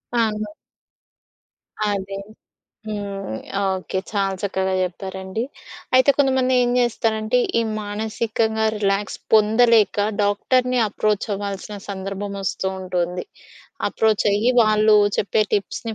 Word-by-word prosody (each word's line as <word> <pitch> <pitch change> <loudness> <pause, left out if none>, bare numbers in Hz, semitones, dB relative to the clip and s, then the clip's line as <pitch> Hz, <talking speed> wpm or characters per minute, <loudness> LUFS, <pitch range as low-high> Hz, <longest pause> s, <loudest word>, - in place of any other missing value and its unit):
అవును. 215 -2 0 1.4
అదే. 195 -1 -3 0.7
హ్మ్. 200 - -4 0.4
ఓకే. 190 0 -2
చాలా 195 -2 0
చక్కగా 190 -1 -1
చెప్పారండి. 190 +3 -4 0.5
అయితే 260 +2 +6
కొంతమంది 260 -2 +3
ఏం 245 - +2
జేస్తారంటే, 225 -1 +1 0.2
ఈ - - +2 0.2
మానసికంగా 220 +1 -1
రిలాక్స్ 200 -1 -1 0.2
పొందలేక 220 -1 +4 0.2
డాక్టరుని 250 +5 +1
అప్రోచవ్వాల్సిన 205 -1 -2
సందర్భం 195 +1 -4
వస్తూ 190 0 -1
ఉంటుంది. 180 -1 -2 0.6
అప్రోచయ్యి 215 +1 +2
వాళ్ళు, 215 0 +4 0.2
చెప్పే 210 +2 +2
టిప్స్‌ని 220 +2 -3
210 Hz, 90 wpm, -22 LUFS, 195-220 Hz, 1.4 s, అయితే